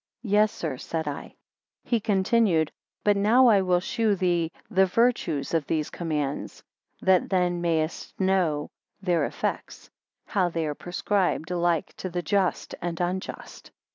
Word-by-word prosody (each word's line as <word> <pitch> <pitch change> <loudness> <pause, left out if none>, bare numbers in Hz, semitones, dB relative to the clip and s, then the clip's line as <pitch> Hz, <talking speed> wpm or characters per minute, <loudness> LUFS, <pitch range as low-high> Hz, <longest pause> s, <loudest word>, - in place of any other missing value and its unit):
Yes, 210 -1 +3
sir, 155 -6 -4
said 160 -2 -3
I. 145 - -4 0.6
2 - - -25
He 235 - +4
continued. 195 -5 +2 0.3
But 205 -1 +4
now 225 +6 +5
I 205 -3 +5
will 180 -1 +2
shew 220 +3 0
thee 175 -3 0 0.2
the 190 0 +3
virtues 180 - +1
of 160 -4 +1
these 155 -2 -1
commands, 150 -5 -3 0.4
that 190 -2 +3
then 180 -2 +1
mayest 165 -2 -2
know 180 -6 +1 0.3
their 180 -4 +1
effects; - - -4 0.3
how 185 -4 +1
they 165 -1 -2
are 150 - -2
prescribed 180 0 -1
alike 175 0 0
to 185 - -4
the 175 0 -3
just 195 +1 0
and 170 -1 -3
unjust. 180 +1 -4
180 Hz, 145 wpm, -26 LUFS, 165-195 Hz, 0.6 s, now